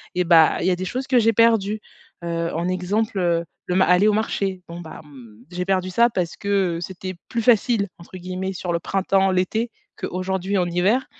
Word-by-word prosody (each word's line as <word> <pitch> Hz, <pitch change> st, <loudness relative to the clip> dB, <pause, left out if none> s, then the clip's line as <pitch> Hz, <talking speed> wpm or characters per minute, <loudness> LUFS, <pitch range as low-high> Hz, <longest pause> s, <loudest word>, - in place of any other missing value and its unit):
et 180 Hz, -, +2 dB
bah, 165 Hz, -2 st, +5 dB
il -, -, 0 dB
y 185 Hz, -, +4 dB
a -, -, +2 dB
des 185 Hz, -, -4 dB
choses 255 Hz, +7 st, -3 dB
que 255 Hz, -2 st, +3 dB
j'ai 225 Hz, 0 st, +3 dB
perdues. 215 Hz, -2 st, +3 dB, 0.4 s
Heu, 170 Hz, 0 st, -2 dB
en 170 Hz, +2 st, -1 dB
exemple, 195 Hz, +3 st, -1 dB
heu, 170 Hz, -2 st, +1 dB, 0.2 s
le 180 Hz, -, -2 dB
ma 190 Hz, -, +5 dB
aller 180 Hz, +3 st, +4 dB
au 215 Hz, -, +4 dB
marché. 200 Hz, -3 st, -1 dB
Bon, 170 Hz, +1 st, -7 dB
bah, 160 Hz, -2 st, -9 dB
mmh, 120 Hz, -6 st, -15 dB
j'ai 180 Hz, 0 st, -3 dB
perdu 185 Hz, -1 st, 0 dB
ça 235 Hz, +6 st, +4 dB
parce 180 Hz, -6 st, -3 dB
que, 195 Hz, -4 st, 0 dB
heu, -, -, -5 dB
c'était 185 Hz, +1 st, -6 dB
plus 230 Hz, -, -2 dB
facile, 220 Hz, -2 st, +3 dB
entre 170 Hz, +2 st, -14 dB
guillemets, 185 Hz, +1 st, -4 dB
sur 180 Hz, -1 st, -4 dB
le 170 Hz, -, 0 dB
printemps, 195 Hz, +1 st, +1 dB
l'été 200 Hz, +6 st, 0 dB, 0.3 s
qu'aujourd'hui, 190 Hz, +2 st, -2 dB
en 180 Hz, -, +2 dB
hiver. 185 Hz, +9 st, +1 dB
185 Hz, 215 wpm, -22 LUFS, 175-205 Hz, 0.4 s, bah